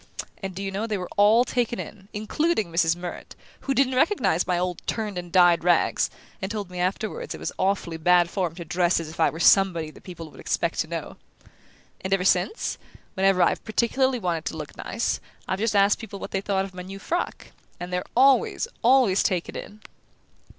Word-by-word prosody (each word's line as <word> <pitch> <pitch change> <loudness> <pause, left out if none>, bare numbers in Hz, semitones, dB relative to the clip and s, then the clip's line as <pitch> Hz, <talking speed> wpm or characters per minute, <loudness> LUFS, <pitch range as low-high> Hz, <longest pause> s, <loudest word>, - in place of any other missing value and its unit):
And, 190 -2 -5
do 195 - -5
you 195 - -3
know, 205 +4 -2
they 215 -2 -1
were 180 -1 -6
all 215 +4 +5
taken 240 -2 -1
in, 195 -2 -8
including 215 - -1
Mrs. 165 0 +2
Murrett, 175 0 -8 0.2
who 275 - -2
didn't 260 0 +3
recognize 255 - +2
my 180 -1 +1
old 180 -1 -2
turned 215 -3 -2
and 175 -1 -6
dyed 175 -2 +5
rags, 175 -1 +2 0.3
and 190 - -3
told 205 -4 -4
me 180 - -6
afterward 195 +4 -2
it - - -10
was - - -3
awfully 190 -4 0
bad 175 +1 +4
form 175 -2 -2
to 170 -1 -7
dress 175 +2 +2
as 165 -2 -6
if 160 - -12
I 160 - +4
were 160 - -8
somebody 175 -4 +4
that - - -16
people 165 -4 -9
would - - -15
expect - - -1
to - - 0
know! - - -6 0.9
And 190 +1 +2
ever 185 -1 -3
since, 190 - +1 0.3
whenever 190 -1 +3
I've - - +1
particularly 250 +4 +1
wanted 175 -6 -2
to 160 - -4
look 150 -2 -7
nice, 230 - -2 0.3
I've 190 - -2
just 220 0 0
asked 200 +1 +4
people 215 -3 -8
what - - -7
they 195 - -1
thought 195 -1 0
of 195 - -11
my 180 - -7
new 190 +2 -8
frock; 340 - -3 0.3
and 180 +1 -6
they're 180 0 0
always, 270 - +4
always 245 -5 +4
taken 180 -3 -1
in!" 210 +1 -8
190 Hz, 205 wpm, -25 LUFS, 175-215 Hz, 0.9 s, all